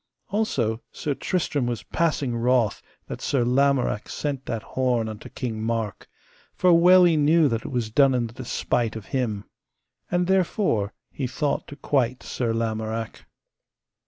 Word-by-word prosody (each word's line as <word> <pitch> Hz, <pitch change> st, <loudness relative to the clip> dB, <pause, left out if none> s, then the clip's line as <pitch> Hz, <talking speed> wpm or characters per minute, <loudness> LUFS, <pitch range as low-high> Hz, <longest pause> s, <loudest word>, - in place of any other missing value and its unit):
Also 125 Hz, -, 0 dB
Sir 145 Hz, -, -2 dB
Tristram 145 Hz, -5 st, -1 dB
was 120 Hz, -4 st, -3 dB
passing 150 Hz, -7 st, 0 dB
wroth 115 Hz, -2 st, +1 dB, 0.2 s
that -, -, -7 dB
Sir 130 Hz, -4 st, +1 dB
Lamorak 130 Hz, -4 st, +1 dB
sent 140 Hz, -3 st, -4 dB
that 115 Hz, -3 st, -3 dB
horn 125 Hz, -3 st, 0 dB
unto 110 Hz, -1 st, -8 dB
King 115 Hz, -4 st, -4 dB
Mark, 110 Hz, -2 st, -3 dB, 0.5 s
for 180 Hz, -1 st, +4 dB
well 180 Hz, +2 st, +7 dB
he 170 Hz, -2 st, +5 dB
knew 155 Hz, +1 st, +4 dB
that 115 Hz, -3 st, -1 dB
it -, -, -4 dB
was 120 Hz, -4 st, -2 dB
done 135 Hz, +2 st, +4 dB
in 120 Hz, -1 st, +1 dB
the 115 Hz, -, -8 dB
despite 120 Hz, -2 st, -1 dB
of 110 Hz, -3 st, -7 dB
him. 110 Hz, -6 st, -1 dB, 0.7 s
And 175 Hz, 0 st, +1 dB
therefore 185 Hz, -, +1 dB, 0.2 s
he 135 Hz, -, -3 dB
thought 140 Hz, +4 st, -2 dB
to 145 Hz, -, -9 dB
quite 130 Hz, -4 st, 0 dB
Sir 120 Hz, -3 st, -2 dB
Lamorak. 110 Hz, 0 st, -3 dB
125 Hz, 155 wpm, -24 LUFS, 115-145 Hz, 0.7 s, well